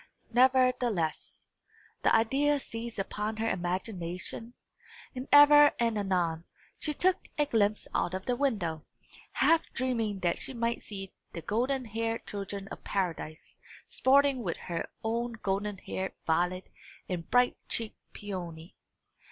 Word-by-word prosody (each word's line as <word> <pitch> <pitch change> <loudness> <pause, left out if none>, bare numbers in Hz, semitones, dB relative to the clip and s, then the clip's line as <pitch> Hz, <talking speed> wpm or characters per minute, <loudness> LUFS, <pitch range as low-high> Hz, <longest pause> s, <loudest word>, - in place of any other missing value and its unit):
Nevertheless, 250 -9 +2 0.6
the - - +4
ideas 275 +6 +2
seized 230 0 -5
upon 210 +2 -3
her 225 +1 0
imagination; 185 +3 -3 0.6
and 255 +2 -5
ever 290 0 +9
and 230 -2 +2
anon, 180 -5 0 0.4
she 305 - -1
took 360 +5 +1
a 295 - +3
glimpse 215 -6 +1
out 180 - 0
of 190 - -5
the 250 - +1
window, 200 - -1 0.5
half 330 0 +3
dreaming 225 -6 -1
that 175 -1 +1
she 265 - -3
might 235 0 -1
see 195 -2 -7 0.2
the 170 - -5
golden 255 +4 0
haired 225 +1 -2
children 200 -1 -5
of - - -9
paradise 170 -5 -3 0.3
sporting 275 -1 +3
with 175 -7 -2
her 170 -2 -4
own 235 +2 -1
golden 205 -1 -2
haired 190 0 -4
Violet 180 +3 0 0.4
and 175 -3 -4
bright 245 0 +4
cheeked 225 -2 -1
Peony. 175 -4 -7
220 Hz, 130 wpm, -30 LUFS, 185-250 Hz, 0.6 s, ever